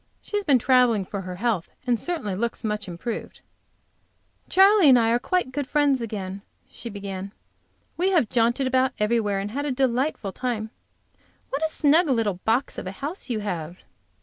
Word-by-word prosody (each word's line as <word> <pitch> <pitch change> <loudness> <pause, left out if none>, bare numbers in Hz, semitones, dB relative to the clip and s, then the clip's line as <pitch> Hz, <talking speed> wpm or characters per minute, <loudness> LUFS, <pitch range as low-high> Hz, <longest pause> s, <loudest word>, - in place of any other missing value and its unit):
She - - -7
has 410 - +1
been 285 -8 +4
traveling, 245 -5 +3
for 200 +1 -5
her 180 -1 -6
health, 210 -3 -1 0.2
and 240 -2 +1
certainly 310 - -3
looks 235 +5 -3
much 210 -2 -2
improved. 180 +6 -6 1.1
"Charley 390 -3 +6
and 255 - +8
I 230 -1 +3
are 240 - +3
quite 360 +1 -1
good 285 0 -3
friends 285 -3 +2
again," 200 -3 -5 0.3
she 235 - -8
began. 200 -1 -6 0.6
"We 365 +2 +2
have 340 - +3
jaunted 240 +4 +1
about 260 0 +2
everywhere, 210 -2 +1
and 200 +1 -3
have 285 +5 -3
a 290 - -1
delightful 255 -4 0
time. 225 -2 -3 0.8
What 275 +3 -2
a 320 - +2
snug 315 +2 +3
little 220 -7 0
box 235 +5 +1
of - - -7
a 185 - -5
house 290 - -5
you 220 -3 -1
have!" 175 -4 -5
235 Hz, 175 wpm, -24 LUFS, 205-275 Hz, 1.1 s, and